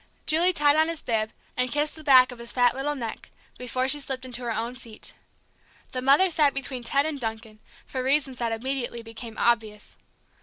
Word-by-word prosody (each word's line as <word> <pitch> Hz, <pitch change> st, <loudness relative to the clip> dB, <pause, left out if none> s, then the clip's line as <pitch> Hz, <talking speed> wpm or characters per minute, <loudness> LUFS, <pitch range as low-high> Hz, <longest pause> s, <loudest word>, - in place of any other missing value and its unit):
Julie 335 Hz, +4 st, +4 dB
tied 295 Hz, -3 st, +4 dB
on 315 Hz, 0 st, +4 dB
his 330 Hz, -2 st, -4 dB
bib, 220 Hz, -1 st, -1 dB, 0.2 s
and 250 Hz, -1 st, 0 dB
kissed 295 Hz, +1 st, 0 dB
the 315 Hz, -, -11 dB
back 260 Hz, -4 st, +6 dB
of 245 Hz, -, -10 dB
his 235 Hz, 0 st, -5 dB
fat 245 Hz, -1 st, +4 dB
little 290 Hz, +2 st, -1 dB
neck, 230 Hz, -5 st, -6 dB, 0.3 s
before 255 Hz, +1 st, -1 dB
she 290 Hz, +2 st, +4 dB
slipped 265 Hz, -2 st, -5 dB
into 250 Hz, -1 st, -4 dB
her 240 Hz, -1 st, -3 dB
own 230 Hz, +3 st, -3 dB
seat. 230 Hz, -4 st, -6 dB, 0.8 s
The 255 Hz, -, -3 dB
mother 285 Hz, +8 st, +5 dB
sat 295 Hz, -4 st, +3 dB
between 270 Hz, -2 st, -3 dB
Ted 280 Hz, +4 st, +1 dB
and 310 Hz, -3 st, -3 dB
Duncan, 220 Hz, -2 st, -6 dB, 0.3 s
for 260 Hz, -, -4 dB
reasons 270 Hz, -1 st, +1 dB
that 235 Hz, -1 st, -1 dB
immediately 240 Hz, 0 st, -3 dB
became 225 Hz, 0 st, -9 dB
obvious. 220 Hz, -3 st, 0 dB
255 Hz, 195 wpm, -26 LUFS, 235-285 Hz, 0.8 s, back